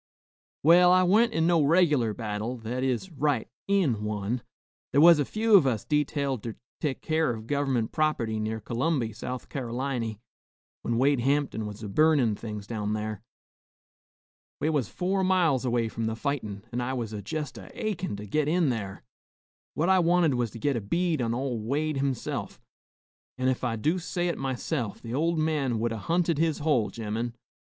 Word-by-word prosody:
"Well, 175 +3 +7
I 185 0 +5
wa'n't 220 +6 +4
in 160 -7 +1
no 170 -1 +4
reg'lar 145 - +3
battle, 110 +2 -3
that 120 +3 -4
is, 130 +8 -1
right 145 -5 0 0.2
in 165 - +2
one. 105 +3 -2 0.5
Thar 140 - +3
was 165 0 +8
a 145 - +2
few 220 - +3
of 165 -9 +6
us 115 -5 -1
detailed 140 -4 0
ter 115 -1 -6 0.2
tek 145 -4 -2
keer 160 -1 +1
of 110 -2 -4
gov'ment 135 -4 0
prop'ty 120 -8 0
near 110 +1 -2
C'lumby, 120 0 -1
South 125 +2 -5
Car'liny, 120 -3 -3 0.6
when 115 - -1
Wade 140 +2 +3
Hamptin 135 -4 0
was 105 +1 -8
a - - -4
burnin' 145 -1 +3
things 105 -2 -7
down 105 -1 -2
thar. 105 -1 -4 1.4
We 155 - +1
was 140 -8 0
four 190 +2 -1
miles 175 -9 +2
away 120 -2 +1
from 115 0 -4
the 110 - -2
fightin,' 115 -7 -3
an' 125 +1 -2
I 125 +2 -2
was 115 -4 -3
jest 130 +2 -5
a - - -11
achin' 195 - -2
to 105 +1 -7
git 145 +8 0
in 165 -3 +2
thar. 100 - -5 0.7
What 160 - +1
I 190 0 +5
wanted 170 -3 +3
was 120 -2 0
to 110 - -10
git 140 +3 +1
a 115 - -1
bead 165 - 0
on 115 -1 0
ol' 125 -2 -2
Wade 145 +7 -1
himself, 135 -3 -3 0.8
an' 130 0 +1
ef 130 - -1
I 120 -2 0
do 155 +11 0
say 175 0 -2
it - - -2
myself, 130 -3 -3
the 115 0 -7
ol' 165 +5 +1
man 150 -6 0
would 115 +1 -1
'a' 115 - -3
hunted 165 - +1
his 160 -2 +2
hole, 145 -8 +1
gemmen. 115 +1 -4
130 Hz, 180 wpm, -27 LUFS, 115-155 Hz, 1.4 s, was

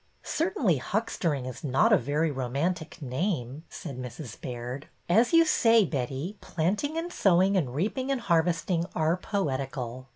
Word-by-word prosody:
'' - - -37
Certainly 310 - +1
huckstering 165 - -1
is 130 -2 -7
not 135 -2 +3
a - - +7
very 150 +5 0
romantic 145 +7 -2
name," 135 - -2
said 140 -6 -7
Mrs. 125 -1 -8
Baird. 125 +3 -5 0.2
As 225 +8 +4
you 330 -1 +6
say, 230 -7 +5
Betty, 140 +6 -3
planting 210 - -1
and 345 +2 -3
sowing 190 +1 +4
and 135 -9 0
reaping 220 - -1
and 270 -3 0
harvesting 170 -1 +1
are 160 +1 +2
poetical." 135 - -3
165 Hz, 150 wpm, -28 LUFS, 130-200 Hz, 0.2 s, a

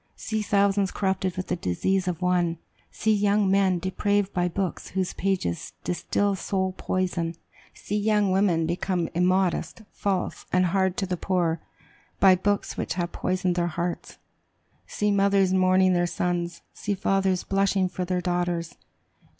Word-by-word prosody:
See 220 -1 -3
thousands 200 -1 +2
corrupted 190 -2 -1
with 185 - -4
the 180 - +1
disease 185 - 0
of 180 0 -2
one! 175 -2 +1 0.3
See 220 0 +1
young 205 -1 +2
men 195 -2 +3
depraved 200 +2 0
by 180 -1 +1
books 185 +1 -3
whose 185 -1 -2
pages 185 - -2
distill 200 +3 0
soul 190 0 -1
poison! 175 -3 -2 0.4
See 210 - -3
young 210 -2 +2
women 185 -4 +2
become 175 0 -1
immodest, 185 +4 +1
false, 195 -3 -2
and 185 0 +3
hard 190 +1 +1
to 195 - 0
the 180 -1 -2
poor, 170 -3 0 0.6
by 190 -1 +7
books 200 +2 -1
which - - -2
have 175 -1 -2
poisoned 185 -1 -1
their 175 0 0
hearts! 175 +1 -4 0.7
See 210 0 0
mothers 200 -1 +3
mourning 185 0 +4
their 175 0 +2
sons! 175 -1 -2
See 205 - -3
fathers 195 -1 +1
blushing 195 -1 +1
for 180 0 -4
their 180 0 -1
daughters! 175 -2 -1
185 Hz, 150 wpm, -26 LUFS, 175-195 Hz, 0.7 s, by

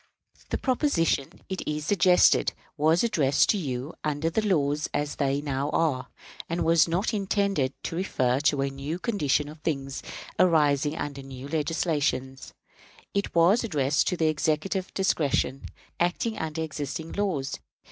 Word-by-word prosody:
The - - -1
proposition, 235 - 0
it 190 -1 -4
is 150 0 -2
suggested, 180 -1 +4 0.2
was 160 +4 +3
addressed 145 - +2
to 210 - +3
you 135 -1 -4
under 155 +2 -1
the 220 - +1
laws 150 -7 +1
as 145 0 -2
they 140 0 +1
now 140 -1 -2
are, 145 -6 0 0.4
and 170 +1 -1
was 165 0 +5
not 180 +8 0
intended 200 -8 0
to - - -4
refer 130 -9 +1
to 145 -1 +2
a 140 - -1
new 140 +5 -4
condition 155 - 0
of 150 +1 -10
things 135 -4 -3 0.4
arising 150 -4 +3
under 145 -2 -4
new 135 0 -9
legislation. 145 -4 -1 0.7
It 200 -2 -2
was 175 +8 +5
addressed 145 - +1
to 180 - 0
the 160 - +1
Executive 155 +5 0
discretion, 150 -7 0 0.3
acting 180 +6 0
under 160 0 -3
existing 155 +1 -5
laws. 180 -10 -2
155 Hz, 145 wpm, -27 LUFS, 140-180 Hz, 0.7 s, was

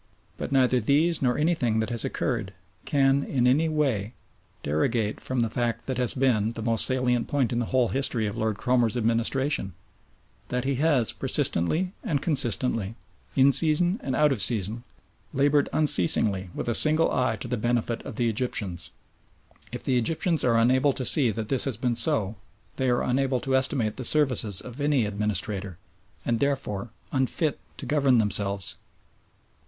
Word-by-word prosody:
But - - -6
neither 130 -2 +3
these 150 +8 +1
nor 125 -2 +1
anything 150 -8 +1
that 110 +2 -2
has 115 -2 0
occurred - - -3 0.3
can 140 -1 +2
in 130 -3 -1
any 150 +6 +3
way 130 -9 -1 0.5
derogate 105 +9 -1
from 130 -2 -2
the 115 - +1
fact 115 -1 -2
that 130 -2 -3
has 125 -2 0
been 115 -5 +1
the 115 - -6
most 115 -1 +2
salient 125 -2 0
point 135 -5 0
in 120 - 0
the 120 - -2
whole 130 -3 +1
history 130 -4 -1
of 105 - -4
Lord 110 -2 -2
Cromer's 120 -2 +1
administration 115 - -1 0.7
that 125 0 -2
he 135 +1 -1
has 140 -6 +2
persistently 160 - -1
and 145 -4 -1
consistently, 120 - +1 0.4
in 135 +1 +5
season 170 - +2
and 130 -1 -3
out 150 +1 +3
of 125 -7 0
season, 110 +1 0 0.5
laboured 145 +1 +2
unceasingly 95 - +1
with - - -4
a 120 - +1
single 155 +6 +5
eye 125 -3 0
to 110 - -8
the 125 - -2
benefit 120 0 -1
of - - -8
the 120 - 0
Egyptians. 105 -7 -2 0.8
If - - -7
the 125 -2 +1
Egyptians 160 +5 +1
are 115 -2 +3
unable 130 +4 +3
to 130 - -4
see 135 -3 +5
that 110 0 -4
this 135 - +2
has 135 -6 -2
been 120 0 -1
so, 110 -3 0 0.4
they 130 -1 0
are 120 - +1
unable 130 0 0
to 135 -1 0
estimate 130 -5 0
the 130 - -5
services 125 -8 +2
of 125 +3 -9
any 145 -5 +2
administrator, 100 -2 -3 0.5
and 115 -1 0
therefore 130 -6 -2 0.2
unfit 140 +3 -1 0.2
to - - -7
govern 140 -4 +2
themselves. 100 -4 -1
125 Hz, 170 wpm, -25 LUFS, 110-135 Hz, 0.8 s, in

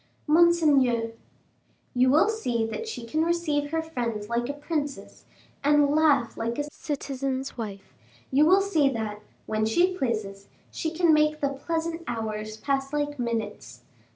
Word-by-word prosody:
"Monseigneur 295 -8 +4 0.4
" - - -40
"You 255 - +6
will 305 +8 +5
see 250 - -1
that 450 - -5
she 245 - -6
can 310 +7 0
receive 320 -4 0
her 325 +1 -1
friends 235 -9 -4
like 240 +2 -1
a - - -1
princess, 290 -1 -5 0.4
and 290 0 +4
laugh 290 -6 +3
like 230 +1 -3
a 290 - 0
citizen's 275 -2 -4
wife; 205 -4 -7 0.4
you 275 +3 +5
will 380 +3 +6
see 325 -8 +2
that, 215 -4 -4 0.2
when 215 0 -1
she 345 +12 +2
pleases, 215 - -3 0.2
she 320 - -2
can 330 0 +3
make 305 0 +3
the 280 - +1
pleasant 330 +4 -3
hours 215 -2 -4
pass 275 +3 -1
like 290 -1 -2
minutes. 210 - -4
275 Hz, 155 wpm, -26 LUFS, 230-315 Hz, 0.4 s, You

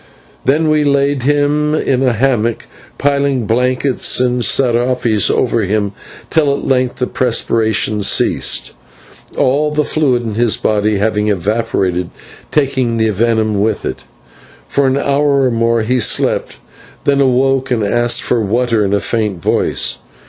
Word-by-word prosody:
Then 155 +3 +2
we 150 -1 +2
laid 140 -1 +1
him 145 +2 +1
in 130 -4 0
a 130 -2 +2
hammock, 115 -2 0 0.3
piling 140 -3 0
blankets 125 +4 +1
and 125 -1 +1
/serapes/ 120 -3 +1
over 115 -2 +1
him 100 0 -1 0.4
till 150 -3 +2
at - - -6
length 130 -2 0
the 125 - -1
perspiration 110 -4 0
ceased, 100 - +1 0.6
all 145 +4 +1
the 150 0 0
fluid 135 -6 0
in 110 -2 -4
his 115 0 +1
body 105 -1 0
having 105 +1 0
evaporated, 95 -3 -1 0.4
taking 130 -5 0
the 110 -1 +1
venom 110 -1 0
with 110 +1 -1
it. - - -5 0.6
For 140 -1 +1
an 130 +1 +1
hour 140 0 +1
or 125 - +1
more 115 0 +1
he 125 +3 0
slept, 115 - 0 0.5
then 140 -1 +2
awoke 135 0 +1
and 120 -4 0
asked 120 +3 +1
for 120 -2 0
water 115 +1 0
in 100 0 0
a - - +1
faint 105 -6 -2
voice. - - -1
125 Hz, 145 wpm, -15 LUFS, 110-135 Hz, 0.6 s, Then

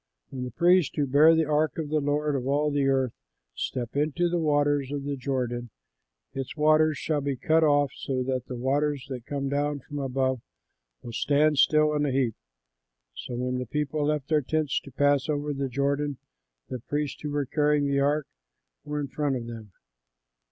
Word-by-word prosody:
When 130 -1 -4
the - - -4
priests 175 +1 +3
who 145 - +1
bear 150 +5 +6
the 160 -1 +2
ark 150 -1 +1
of 155 -3 -3
the 155 0 +1
Lord 145 +1 0
of 130 -1 -2
all 145 +2 +1
the 140 -1 +1
earth 130 -3 +1 0.4
step 125 - -4
into 155 +4 +1
the 175 0 0
waters 145 -3 +1
of 145 -1 -3
the 140 0 -2
Jordan, 125 -3 -3 0.6
its 135 +2 -5
waters 155 0 +4
shall 150 -2 -1
be 140 -1 -1
cut 160 +5 +2
off, 145 -2 +3
so 130 -2 -2
that 130 -1 -2
the 125 - -5
waters 140 +2 0
that 125 -2 -6
come 140 -1 -2
down 145 +1 -1
from 145 +2 -7
above 130 -2 -1 0.6
will 120 - -8
stand 150 +3 +2
still 155 +1 +4
in 150 0 +1
a - - 0
heap." 130 -4 +1 0.8
So 125 - -6
when 125 +1 -2
the 125 - -4
people 150 +3 -1
left 150 -3 -1
their 155 -2 +2
tents 155 +1 0
to 140 - -10
pass 145 +1 +2
over 145 0 -1
the 135 -1 -2
Jordan, 140 +2 -1 0.5
the 130 - -5
priests, 145 +3 -3
who 150 - -4
were 145 -1 -1
carrying 150 +1 +2
the 140 0 +1
ark 145 +1 +1 0.6
were 150 +1 -3
in 145 - -2
front 145 0 -1
of 120 -2 -4
them. 115 -3 -9
145 Hz, 195 wpm, -27 LUFS, 130-150 Hz, 0.8 s, bear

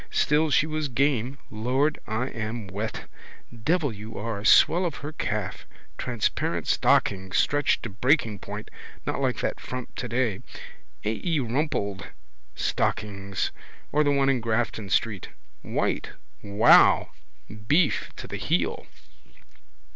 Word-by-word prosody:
Still 155 +2 +2
she 145 +1 +4
was 155 -1 -2
game. 130 0 0
Lord, 130 +8 0
I 110 +4 -1
am 115 0 -4
wet. 100 +4 -5 0.5
Devil 145 +4 0
you 105 +2 -9
are. 105 -1 -4
Swell 175 +9 +6
of 170 -4 -1
her 150 - -4
calf. 155 - -3 0.3
Transparent 120 -5 -1
stockings, 95 -2 +2
stretched 145 -1 +2
to - - -4
breaking 115 - +2
point. - - -7 0.3
Not - - -2
like - - 0
that - - -2
frump 125 -1 -6
today. 120 -4 -1 0.7
A. 105 - +2
E. 165 -4 +1
Rumpled 120 -6 -1 0.5
stockings. 100 -2 -1 0.4
Or 150 +1 +3
the 145 - +2
one 140 -1 +2
in 135 -2 +3
Grafton 110 -2 -1
street. 105 -2 0 0.3
White. - - -1 0.3
Wow! 105 +3 +5 0.6
Beef 155 +3 +2
to - - -8
the - - -5
heel. - - -1
120 Hz, 125 wpm, -26 LUFS, 105-145 Hz, 0.7 s, Swell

